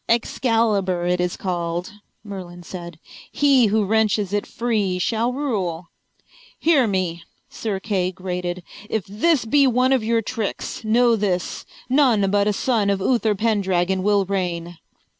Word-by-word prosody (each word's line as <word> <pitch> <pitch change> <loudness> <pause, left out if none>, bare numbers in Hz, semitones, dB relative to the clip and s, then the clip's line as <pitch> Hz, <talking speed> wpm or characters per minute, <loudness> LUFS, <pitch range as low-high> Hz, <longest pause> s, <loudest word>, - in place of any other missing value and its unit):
"Excalibur 225 -6 +1
it 180 0 +1
is 180 0 -2
called," 175 +1 -3 0.3
Merlin 180 -4 -8
said. 175 -2 -8 0.3
"He 275 -5 +4
who 210 0 +1
wrenches 210 -1 +1
it 205 - -1
free 215 -6 -1
shall 225 +6 0
rule." 195 - -3 0.7
"Hear 295 -7 +3
me," 185 -4 -1 0.3
Sir 210 -4 -3
Kay 190 -3 -1
grated. 180 -1 -4 0.3
"If 215 -5 -1
this 245 +8 +1
be 280 +4 +4
one 255 +1 +3
of 255 -4 +1
your 225 0 +1
tricks, 220 -1 -4
know 235 +2 +3
this: 190 -5 -2 0.2
none 245 -8 +3
but 205 0 +2
a - - +3
son 220 -2 +1
of 200 -1 +1
Uther 220 0 +1
Pendragon 190 -4 +1
will 200 0 +2
reign." 175 -3 -3
205 Hz, 140 wpm, -22 LUFS, 180-230 Hz, 0.7 s, He